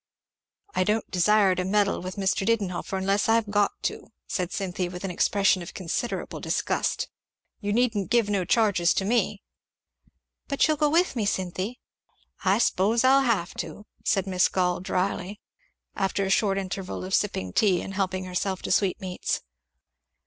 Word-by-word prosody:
"I - - +2
don't 210 +3 -1
desire 195 +1 +4
to 180 0 -1
meddle 200 +1 +1
with 185 +1 -6
Mr. 195 -1 0
Didenhover 195 -3 -1
unless 195 +3 +1
I've 225 -2 +2
got 205 -1 +3
to," - - -3 0.2
said 180 -1 -2
Cynthy 180 -2 -2
with 180 +1 -8
an 195 - -2
expression 195 +1 +2
of 175 - -9
considerable 195 +7 -3
disgust. - - -1 0.5
"You 205 -1 -2
needn't 220 -3 +1
give 235 -3 +3
no 200 -3 0
charges 190 -3 +3
to 190 - 0
me." 210 -2 0 1.0
"But 280 - +2
you'll 310 -1 +1
go 300 0 +3
with 335 0 +2
me, 215 -4 0
Cynthy?" 190 +5 -3 0.6
"I 195 +1 +3
s'pose 225 +1 +2
I'll 270 +1 +6
have 220 -9 0
to," 210 - -6 0.2
said 195 -1 +1
Miss 185 -1 +2
Gall 180 -1 0
dryly, 185 +2 -2 0.6
after 195 0 0
a 190 - -1
short 195 -1 +2
interval 185 -1 -4
of 190 - -6
sipping 95 - 0
tea 190 -5 +3
and 195 - -6
helping 185 -1 -1
herself 185 +1 -2
to - - -3
sweetmeats. 190 -2 0
195 Hz, 160 wpm, -26 LUFS, 185-210 Hz, 1.0 s, I'll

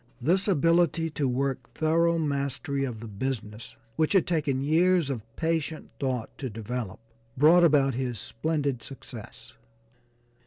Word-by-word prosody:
This 180 - +2
ability 165 -1 +2
to 145 -2 -1
work 130 0 -1
thorough 165 +2 +2
mastery 140 -1 -1
of 115 -4 -6
the 115 - -7
business, 110 0 -5 0.2
which 155 +3 +2
had 190 - +4
taken 150 -6 0
years 165 0 +3
of 125 -5 -3
patient 160 -1 -2
thought 130 -4 -2
to 130 - -3
develop, 115 -1 -5 0.4
brought 165 +6 +6
about 140 -4 +4
his 125 -1 -2
splendid 140 -1 -2
success. 115 -1 -11
140 Hz, 130 wpm, -27 LUFS, 125-165 Hz, 0.4 s, brought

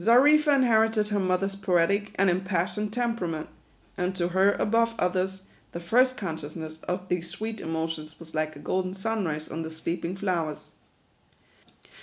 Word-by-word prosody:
Xarifa 290 - +6
inherited 225 -4 +3
her 205 -1 +1
mother's 190 +1 0
poetic 195 +2 +1
and 195 - +3
impassion 185 +2 0
ed 210 - -12
temperament; 230 -10 -2 0.5
and 185 0 -1
to 175 -1 0
her, 190 +3 +4
above 230 +1 +2
others, 185 +1 0 0.3
the 170 - -4
first 250 +9 +3
consciousness 160 -3 -6
of 180 +1 -2
these 175 -2 -1
sweet 220 -1 -5
emotions 160 -1 -4
was 165 -1 -11
like 155 -1 -1
a - - -10
golden 185 +3 -1
sunrise 190 -7 -2
on 165 - -5
the 160 - -4
sleeping 165 +2 -3
flowers. 175 -6 -2
185 Hz, 150 wpm, -27 LUFS, 165-215 Hz, 0.5 s, Xarifa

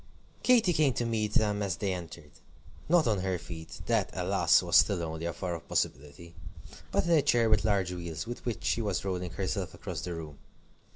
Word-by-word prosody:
Katy 230 -8 +4
came 150 -5 +3
to 120 - -1
meet 110 -2 -1
them 105 -1 +2
as 95 -3 -1
they 100 -2 -1
entered. 85 -4 -8 0.6
Not 170 -2 +5
on 105 -4 +1
her 95 -1 -1
feet: 80 -1 -9
that, - - +1
alas! - - +3
was - - 0
still 90 -4 +3
only 80 0 -4
a - - -1
far 85 +1 -4
off 85 - -10
possibility; 75 +5 -3 0.6
but - - +2
in 170 - 0
a 160 -3 +6
chair 120 -5 +3
with 110 - +4
large 100 -4 +1
wheels, 85 -3 -5
with 120 +1 -7
which 120 -3 -4
she 115 - +1
was 100 -3 -2
rolling 90 -2 -2
herself 95 0 -3
across 90 -6 -6
the 90 0 -4
room. 75 -3 -8
95 Hz, 205 wpm, -30 LUFS, 85-110 Hz, 0.6 s, a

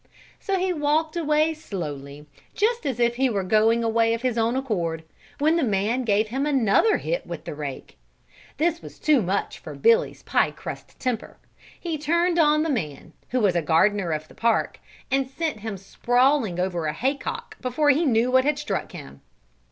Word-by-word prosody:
So 390 -1 -1
he 370 0 0
walked 310 +1 0
away 310 -1 +2
slowly, 150 - -7 0.3
just 450 -4 0
as 255 -3 -2
if 235 0 +2
he 265 0 +2
were 200 -4 -1
going 220 +4 +3
away 230 0 +2
of 230 - -8
his 250 -3 0
own 230 +1 +1
accord, 175 -12 -2 0.3
when 310 +3 +2
the 335 - +1
man 215 +2 0
gave 215 0 +2
him 270 +5 -1
another 275 - +3
hit - - -3
with - - -6
the - - -5
rake. - - -7 0.6
This 335 +1 0
was - - -11
too 300 -5 +3
much 195 +1 -2
for - - -9
Billy's 460 +2 +2
pie - - +2
crust - - -9
temper; 250 -4 -3 0.4
he 330 -4 -4
turned 340 +3 +1
on 305 -1 +4
the 325 - -1
man, 160 - -4 0.2
who 255 0 0
was 195 -4 +2
gardener 185 +4 +2
of 155 0 -3
the - - -17
park, 230 0 0 0.3
and 270 -1 +1
sent 310 -4 -3
him 215 -1 -5
sprawling 245 0 +1
over 175 -3 -1
a 150 - -1
hay 260 - 0
cock 470 +11 -7
before 280 +4 +2
he 300 +5 +2
knew 245 -3 +2
what 260 0 +5
had 295 +1 +1
struck 295 0 -3
him. 70 0 -10
250 Hz, 185 wpm, -24 LUFS, 205-300 Hz, 0.6 s, what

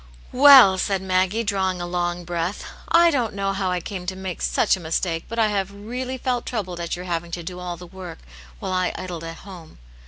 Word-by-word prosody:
*' - - -23
Well," 255 -8 +8
said 195 -1 0
Maggie, 190 +4 +1
drawing 190 -3 -1
a 175 - -3
long 175 0 -2
breath, 175 +3 -3 0.2
" - - -21 0.2
I - - +4
don't 245 -8 -1
know 195 0 -1
how 195 -1 -1
I 180 0 0
came 180 0 -7
to 185 - -2
make 190 -2 -6
such - - +2
a - - -9
mistake, 165 0 -2
but 230 - -6
I 220 -2 +3
have 200 -1 -1
really 250 +6 -5
felt 250 -1 -2
troubled 185 -7 -4
at 170 -1 -3
your 180 +1 -8
having 170 -1 -3
to 170 0 -5
do 180 +2 -7
all 175 -1 -5
the 180 - -10
work, 185 +1 -9 0.4
while 185 - -3
I 185 0 0
idle 175 -3 -6
at 165 0 -7
home. 180 -5 -12
185 Hz, 230 wpm, -23 LUFS, 175-205 Hz, 0.4 s, Well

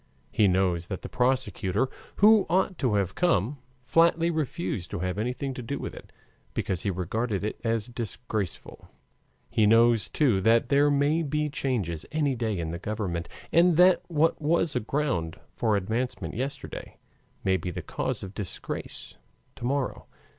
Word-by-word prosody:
He 105 - +4
knows 90 -2 +1
that 95 - -5
the - - -6
prosecutor, 125 -3 +1 0.3
who 215 0 +6
ought 185 +1 +1
to 120 -6 +1
have 95 -3 0
come, 145 - +1 0.3
flatly 165 +2 +4
refused 155 - -2
to - - -4
have 90 +2 -2
anything 125 +4 -2
to 125 - -6
do 140 +4 -4
with - - -5
it, - - -12 0.4
because 95 -4 -1
he - - -1
regarded 100 +3 -2
it 105 +1 -4
as 115 -2 0
disgraceful. 115 -5 -5 0.6
He 110 -2 +3
knows, 115 0 +5
too, 120 -11 +2
that 115 +3 +3
there 145 +1 +4
may 145 +3 +2
be 150 0 -1
changes 110 - -2
any 150 -3 +1
day 110 -4 -1
in 80 -2 -3
the 85 - -5
government, 95 -5 -3 0.2
and 170 -1 +5
that 180 +1 +6
what 160 -1 +1
was 155 0 +1
a - - +3
ground 120 - -2 0.2
for 110 -3 +1
advancement 115 +6 -2
yesterday 135 +3 -5 0.5
may 95 -1 +3
be 90 - -3
the 90 - -5
cause - - -3
of 95 0 -7
disgrace 100 -4 -6 0.4
to - - -7
morrow. 135 +1 -1
120 Hz, 160 wpm, -27 LUFS, 100-145 Hz, 0.6 s, who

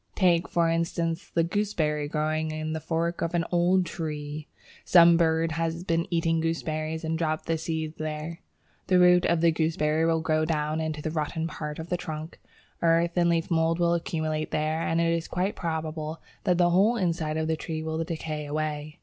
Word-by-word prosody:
Take, 175 -3 +3
for 170 -1 +2
instance, 165 0 -1
the 165 - +2
Gooseberry 165 -5 -1
growing 155 +1 -1
in 155 0 -3
the 160 - -2
fork 170 +2 -2
of 165 +1 -1
an 165 -1 +1
old 180 +1 +3
tree. 155 -2 -5 0.4
Some 170 -1 +7
bird 165 -1 +2
has 165 +1 -2
been 170 -1 0
eating 165 -1 +1
gooseberries 160 -1 -2
and 160 0 -2
dropped 155 -2 -1
the 165 - 0
seed 160 -1 -4
there. 155 +2 -4 0.5
The 185 - +4
roots 180 0 +5
of 170 -1 +2
the 170 0 +5
gooseberry 160 0 +1
will 165 -1 +2
grow 155 -1 +1
down 155 0 -1
into 155 -1 -3
the 155 - -2
rotten 160 +1 -2
part 150 -2 -5
of 160 +1 -7
the 180 - 0
trunk. 155 -1 -7 0.4
Earth 170 0 +3
and 175 -1 +3
leaf 170 +1 0
mould 165 0 +2
will 170 -1 +2
accumulate 155 -2 -2
there, 155 +1 -1
and 165 0 0
it 165 0 +2
is 165 -1 -2
quite 185 +3 -1
probable 160 -1 -3 0.3
that 180 -1 +3
the 175 -1 +4
whole 205 +7 +4
inside 165 -5 -1
of 160 0 -1
the 160 - +1
tree 155 0 -5
will 160 +1 -2
decay 155 -2 -4
away. 150 0 -3
160 Hz, 190 wpm, -27 LUFS, 155-170 Hz, 0.5 s, Some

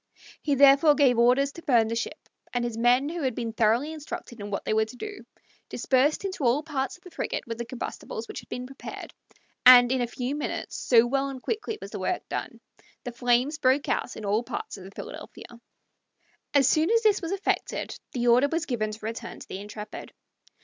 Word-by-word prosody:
He 290 -2 +1
therefore 280 +2 +6
gave 260 -5 +4
orders 255 +4 +4
to 335 - -11
burn 235 -7 +3
the 230 - -2
ship, 230 - -5 0.3
and 245 -1 0
his 235 -2 -3
men, 245 +4 +3
who 335 +2 -4
had 260 -5 -1
been 230 -2 -3
thoroughly 230 +7 +2
instructed 310 -5 -8
in 205 0 -6
what 200 - -4
they - - 0
were 220 0 +3
to 220 - -12
do, 410 - -8 0.4
dispersed 280 +8 +1
into 375 -6 -4
all 255 +5 +3
parts 275 -3 -3
of 360 - -31
the 365 - -12
frigate - - -3
with 230 -1 -6
the 235 - -3
combustibles 235 -2 -6
which - - -6
had - - -15
been 250 - -5
prepared, 270 +1 -9 0.5
and 245 -1 +9
in 260 -1 +1
a 240 - 0
few 250 +3 -3
minutes, 295 - -4
so 235 -2 +4
well 275 +2 0
and 260 -2 -8
quickly 445 0 -3
was - - -9
the - - -5
work - - -2
done, - - -4 0.4
the 245 - -5
flames 245 +5 +1
broke 270 0 +2
out - - -1
in 220 - -6
all 205 +3 +2
parts 240 - -6
of 190 -3 -11
the - - -9
Philadelphia. 195 - -9 1.1
As 275 -2 +5
soon 315 +3 +3
as 460 +1 +3
this 420 -2 +3
was 335 0 -4
effected 395 0 -2
the 245 -1 -1
order 245 +3 +5
was 330 0 0
given 215 -5 -1
to 215 0 -8
return 225 +1 -6
to - - -11
the 190 - -6
Intrepid. 210 +1 -8
255 Hz, 215 wpm, -26 LUFS, 235-295 Hz, 1.1 s, and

